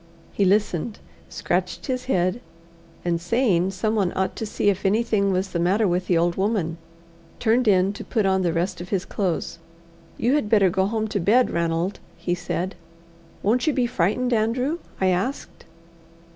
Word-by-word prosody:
He 200 - +2
listened, 205 +1 +1 0.3
scratched - - -2
his 255 -2 -2
head, 185 -1 0 0.6
and 170 -1 0
saying 190 -2 +2
someone 195 0 0
ought 190 0 -1
to 220 - -3
see 205 0 +2
if 190 0 -5
anything 205 -1 +2
was 190 +1 0
the 170 - -1
matter 195 +5 +2
with 180 +1 0
the 175 - +3
old 170 +1 +1
woman, 190 -5 -1 0.6
turned 235 +1 +2
in 190 -1 +4
to 200 - -8
put 220 -5 0
on 190 0 +2
the 175 -2 +1
rest 175 +2 -2
of 175 - -8
his 190 -3 -1
clothes. 185 -4 -2 0.6
"You 240 +4 +1
had 290 -8 +1
better 200 -5 +4
go 190 +1 +1
home 220 +1 -1
to 205 - -1
bed, 225 +8 +3
Ranald," 170 +3 -1 0.2
he 175 - -2
said. 180 +1 -3 0.7
"Won't 240 +9 +2
you 305 - +3
be 250 -2 +1
frightened, 240 +3 0
Andrew?" 250 +8 0 0.2
I 190 - +3
asked. 195 +10 -3
195 Hz, 170 wpm, -23 LUFS, 180-225 Hz, 0.7 s, in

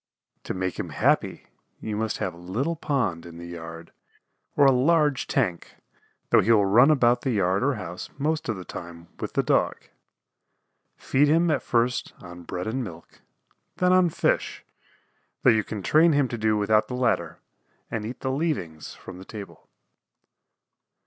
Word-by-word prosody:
To - - -4
make 95 0 -3
him - - -3
happy - - 0 0.3
you 110 - -4
must 110 0 -2
have 90 - -3
a 85 - -14
little 115 - -2
pond 135 - -1
in 85 -1 -11
the 85 - -8
yard 85 -1 -9 0.7
or 145 - +6
a 135 - +7
large 145 +1 +2
tank, 95 -11 -1 0.6
though - - +6
he 115 - +2
will 105 -3 +5
run 120 +9 +6
about 125 -5 +3
the 135 - -2
yard 95 -4 +1
or 140 +1 +1
house 90 -4 -7
most 155 0 -1
of 110 - 0
the 90 -1 -8
time 85 -1 -9
with - - -5
the - - +1
Dog. - - +1 1.2
Feed 140 +3 +2
him 165 +2 +3
at 140 - +1
first 120 +1 0
on 90 -1 -11
bread 90 +1 -5
and 125 +4 -2
milk, 85 -6 -11 0.6
then 180 0 +3
on 185 -1 +5
fish, - - -1 0.8
though 125 - +7
you 110 -1 +2
can 105 -2 -6
train 160 - +4
him 140 -2 +2
to 120 - -4
do 110 0 +2
without 105 +1 +2
the 125 - -5
latter 85 -10 0 0.5
and 110 -2 -3
eat 115 +4 -7
the 130 - -1
"leavings" 130 - -3
from 90 -1 -11
the - - -9
table. 105 -1 -10
110 Hz, 175 wpm, -25 LUFS, 90-135 Hz, 1.2 s, a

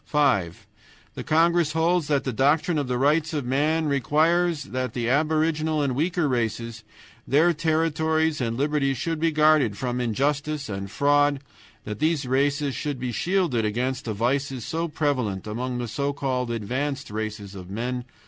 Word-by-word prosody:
"5. 100 - +1 0.5
The - - -6
congress 165 0 +2
holds 165 0 +1
that 145 -2 +1
the 130 - -3
doctrine 150 - +2
of 140 - -2
the 125 0 -1
Rights 150 +4 +2
of 145 -4 -2
Man 150 +5 +1
requires 155 +4 +2
that 130 -2 -4
the 120 -2 -2
aboriginal 155 +2 +1
and 135 -2 0
weaker 165 +4 0
races, 115 -2 -2 0.4
their 160 +6 +4
territories 160 -1 +1
and 115 -1 -1
liberties, 140 -1 0
shall 165 +6 -2
be 165 +1 +1
guarded 150 -8 +3
from 125 +1 -2
injustice 140 +4 -1
and 100 -1 -5
fraud, 145 +4 +3
and 135 - -11 0.4
that 105 0 -6
these 155 -3 +1
races 140 +2 +1
shall 145 +4 -3
be 125 -1 -4
shielded 170 - 0
against 125 +5 -2
the 110 -3 -3
vices 130 +2 -1
so 165 +1 -2
prevalent 130 - -1
among 125 +4 -3
the 120 -1 -3
so 140 +5 -2
called 130 -3 -2
advanced 130 +5 -3
races 105 -2 -5
of 90 -2 -9
men. 120 +4 -3
140 Hz, 165 wpm, -25 LUFS, 120-155 Hz, 0.5 s, their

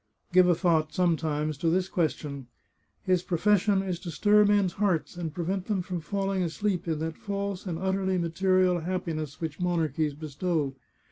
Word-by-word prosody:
" - - -35
Give 185 0 +6
a 175 - +4
thought, 160 -3 +2
sometimes, 155 -4 0
to 165 - +1
this 180 +2 +1
question: 150 -7 -2 0.6
His 185 -2 +2
pro 180 -1 -2
fession 200 0 +3
is 180 -2 -2
to 175 - -7
stir 210 +5 +4
men's 200 -3 +3
hearts, 190 -5 0
and 170 -2 -4
prevent 180 +4 -3
them 195 -4 0
from 180 -2 -4
falling 195 +3 -1
asleep 180 +2 -1
in 160 -2 0
that 160 +1 -4
false 200 -1 -4
and 170 -3 -2
utterly 190 +1 0
material 180 +1 +2
happiness 165 -4 -3
which 160 -3 -4
monarchies 160 -4 0
bestow. 155 -1 -2
175 Hz, 175 wpm, -28 LUFS, 160-190 Hz, 0.6 s, Give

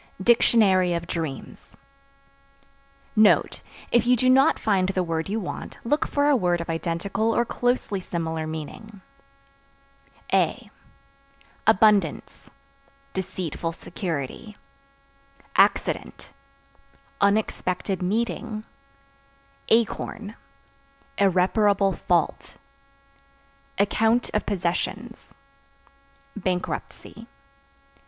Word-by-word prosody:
DICTIONARY 195 -6 +4
OF 170 0 -3
DREAMS. 160 -6 -6 1.4
(Note. 215 -1 +4 0.3
If 240 -1 +3
you 250 - +5
do 255 +2 +3
not 270 +4 +5
find 190 -3 +1
the 185 -1 0
word 165 0 -3
you 215 +3 -1
want, 185 - -6
look 295 +6 0
for 285 0 +1
a 295 - +5
word 175 -7 +1
of 170 0 -4
identical 175 +7 -1
or 235 - +2
closely 245 -5 -1
similar 160 -3 -3
meaning.) 175 +7 -8 1.3
A - - +1 1.0
Abundance 210 -1 +2 0.6
Deceitful 175 -3 -4
security. 180 - -6 1.0
Accident - - +1 0.9
Unexpected 200 -2 0
meeting. 215 +2 -2 1.1
Acorn 225 -1 0 0.9
Irreparable 195 +1 +3
fault. 170 -1 -1 1.2
Account 225 +4 +2
(Of 210 - -1
possessions) 200 +5 -3 1.0
bankruptcy. 190 +3 -4
200 Hz, 80 wpm, -24 LUFS, 175-225 Hz, 1.4 s, you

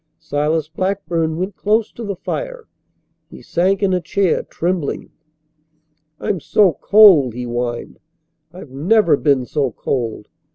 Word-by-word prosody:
Silas 155 0 -1
Blackburn 170 -2 -2
went 185 +2 -3
close 215 +2 0
to 235 - -9
the 200 -2 -4
fire. - - -6 0.6
He - - -13
sank 190 +3 0
in 190 -2 +2
a 180 - 0
chair, 185 +1 0
trembling. 175 -3 -3 1.1
"I'm 190 - -2
so 185 +4 +3
cold," 185 - +6
he 125 - -4
whined. 120 0 -4 0.5
"I've 175 -6 -12
never 170 +5 +3
been 140 -3 +1
so 140 0 -1
cold. 115 -3 -4
170 Hz, 130 wpm, -18 LUFS, 145-200 Hz, 1.1 s, cold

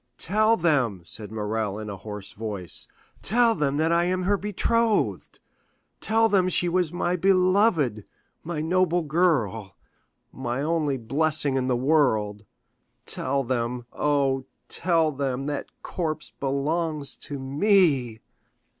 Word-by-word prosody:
"Tell 215 +5 +3
them," 135 - +1
said 105 +4 -4
Morrel 105 -1 -2
in 110 0 -6
a 100 - -5
hoarse 105 0 -8
voice, 100 -5 -2 0.3
"tell 230 +2 +3
them 145 -6 -1
that 160 +2 +1
I 170 +1 +3
am 185 +1 0
her 200 +3 +2
betrothed. 210 +3 0 0.6
Tell 225 +1 +3
them 190 -4 +2
she 180 - +1
was 175 -2 +1
my 175 0 -1
beloved, 185 - +2 0.4
my 160 -2 -3
noble 175 +1 +1
girl, 135 - 0 0.6
my 120 +3 -3
only 155 -3 0
blessing 140 +3 0
in 130 -1 0
the 125 -2 +1
world. 110 -7 +1 0.6
Tell 140 +1 +1
them—oh, 130 +3 -1 0.2
tell 165 -3 +2
them, 135 -1 -3
that 145 -1 -3 0.2
corpse 155 -3 -3
belongs 145 +2 -1
to 145 - -6
me!" 140 - +2
150 Hz, 125 wpm, -25 LUFS, 120-175 Hz, 0.6 s, Tell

